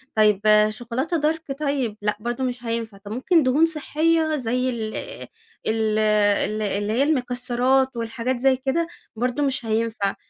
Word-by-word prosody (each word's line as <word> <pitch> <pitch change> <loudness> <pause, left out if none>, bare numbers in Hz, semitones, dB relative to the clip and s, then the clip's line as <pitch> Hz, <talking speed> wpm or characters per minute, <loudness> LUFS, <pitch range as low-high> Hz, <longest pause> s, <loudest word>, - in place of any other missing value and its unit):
طيب 210 -2 +4 0.3
شوكولاتة 245 +9 -3
dark 320 -3 -10
طيب، 275 -7 -1
لأ 210 0 -1
برضو 240 +3 -3
مش 250 -1 -3
هينفع، 230 -3 -3
طب 200 +1 -11
ممكن 305 +7 +2
دهون 275 +5 +4
صحية 320 0 +1
زي 250 -1 -1
ال 220 -3 -4 0.7
ال 220 -1 +1
ال 210 0 +2
اللي 205 +1 -1
هي 255 - +3
المكسرات 255 -2 +1
والحاجات 235 +2 -2
زي 265 +1 +4
كده، 275 +6 -1 0.3
برضو 250 +4 -1
مش 265 -3 -2
هينفع 220 -2 -1
245 Hz, 145 wpm, -23 LUFS, 220-270 Hz, 0.7 s, طيب